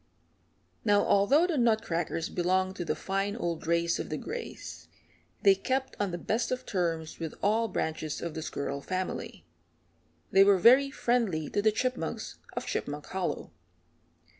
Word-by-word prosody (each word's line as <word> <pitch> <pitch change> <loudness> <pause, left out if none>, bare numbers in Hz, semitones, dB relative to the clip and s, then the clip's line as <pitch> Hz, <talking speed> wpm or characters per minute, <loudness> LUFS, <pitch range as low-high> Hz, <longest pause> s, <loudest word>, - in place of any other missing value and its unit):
Now 205 -2 +4
although 270 - +4
the 335 -6 0
Nutcrackers 175 -8 0
belonged 185 +1 +1
to 175 - -3
the 155 - 0
fine 195 +5 -2
old 170 -7 -3
race 170 0 +2
of - - -4
the - - -2
Grays, 480 -1 -7 0.6
they 195 - +8
kept 265 +7 -2
on 205 -1 +1
the 175 - -3
best 220 +7 -1
of 255 0 -2
terms 165 -5 -2
with 165 -2 -5
all 220 +3 +3
branches 155 -5 -3
of 170 -2 -4
the 160 - -4
squirrel 140 -2 -4
family. 185 +4 -4 0.9
They 195 - +7
were 200 -1 +5
very 255 +8 +6
friendly 230 - 0
to 205 - +1
the 215 +1 +4
Chipmunks 255 +4 -3
of - - -4
Chipmunk - - -3
Hollow. - - -3
195 Hz, 155 wpm, -29 LUFS, 170-230 Hz, 0.9 s, they